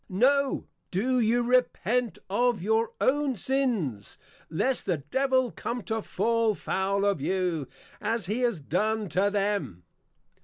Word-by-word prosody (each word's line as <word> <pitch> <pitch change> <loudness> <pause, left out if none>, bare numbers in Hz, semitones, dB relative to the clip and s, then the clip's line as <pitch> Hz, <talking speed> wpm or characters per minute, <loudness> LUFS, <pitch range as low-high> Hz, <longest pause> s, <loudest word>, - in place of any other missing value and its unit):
_ - - -48
No, 270 +8 +2 0.2
Do 250 +8 +1
you 235 +1 +2
Repent 245 -2 +1
of 235 0 +1
your 220 +2 +1
own 280 0 +2
Sins, 210 - -1 0.3
Lest 245 +11 0
the 180 -4 +1
Devil 260 - +1
come 240 -1 -4
to 220 +2 -2
fall 230 0 +1
foul 195 +2 -1
of 200 -8 +1
you, 180 -4 -1 0.3
as 225 -1 -1
he 210 +6 -1
has 235 -8 +1
done 210 +7 -1
to 195 +4 +2
them. 200 - -1
220 Hz, 140 wpm, -27 LUFS, 190-250 Hz, 0.3 s, No